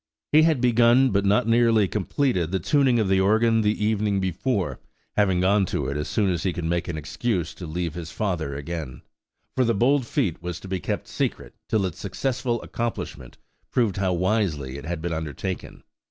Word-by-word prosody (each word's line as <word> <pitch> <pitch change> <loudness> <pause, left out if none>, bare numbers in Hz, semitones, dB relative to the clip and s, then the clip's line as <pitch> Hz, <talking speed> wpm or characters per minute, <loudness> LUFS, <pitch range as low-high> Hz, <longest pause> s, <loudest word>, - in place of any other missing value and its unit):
He 155 - +7
had 155 -5 +3
begun, 120 +1 +5
but 100 0 +1
not 105 +4 +3
nearly 115 -3 +4
completed, 105 - 0
the 95 - 0
tuning 130 - +2
of 110 -3 +1
the 95 0 +3
organ 110 +3 +3
the 105 0 +1
evening 105 -2 +1
before, 95 - -1 0.4
having 95 -4 +2
gone 95 +1 +3
to - - -2
it 70 - -2
as 75 +1 -2
soon 100 -3 +1
as 85 -3 -1
he 95 -1 0
could 85 - -4
make 85 +1 -1
an 85 - -3
excuse 85 +3 -2
to 90 - -8
leave 85 0 -3
his 85 -1 -7
father 85 -9 -2
again; 75 -3 -6 0.5
for 130 - +3
the 115 -2 +1
bold 130 +4 +2
feat 95 - -1
was 85 -1 -5
to - - -9
be 95 -1 -2
kept - - -3
secret - - -3 0.2
till 105 -3 +2
its 90 -3 -5
successful 125 +3 -2
accomplishment 115 - -5 0.3
proved 115 -7 +1
how 95 -2 +1
wisely 85 -8 0
it 70 - -10
had 85 -1 -4
been 85 -1 -2
undertaken. 80 +4 -5
95 Hz, 195 wpm, -24 LUFS, 85-115 Hz, 0.5 s, He